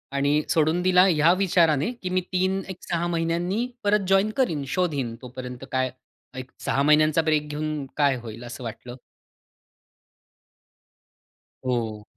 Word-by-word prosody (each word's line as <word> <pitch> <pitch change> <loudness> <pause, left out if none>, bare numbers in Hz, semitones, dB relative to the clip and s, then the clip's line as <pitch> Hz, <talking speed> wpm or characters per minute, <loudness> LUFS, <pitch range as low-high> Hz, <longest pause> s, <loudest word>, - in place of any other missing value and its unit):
आणि 145 +2 +2
सोडून 160 +2 +2
दिला 180 0 +5
ह्या 165 -1 +4
विचाराने 165 - +3
की 185 - -3
मी 185 0 +1
3 185 +1 +1
एक 190 - -6
6 170 0 -1
महिन्यांनी 175 +6 -1 0.2
परत 205 -1 +2
जॉइन 195 +2 +3
करीन, 165 - +1
शोधिन, 145 -8 -1
तोपर्यंत 125 0 -8
काय 130 -1 0 0.5
एक 130 0 -7
6 140 - +1
महिन्यांचा 155 +2 +4
ब्रेक 155 -2 +1
घेऊन 150 -1 -3
काय 140 -3 +3
होईल, 115 0 -9
असं 120 +1 -8
वाटलं. 120 +2 -7 2.7
हो. 115 -4 -2
155 Hz, 135 wpm, -25 LUFS, 130-180 Hz, 2.7 s, दिला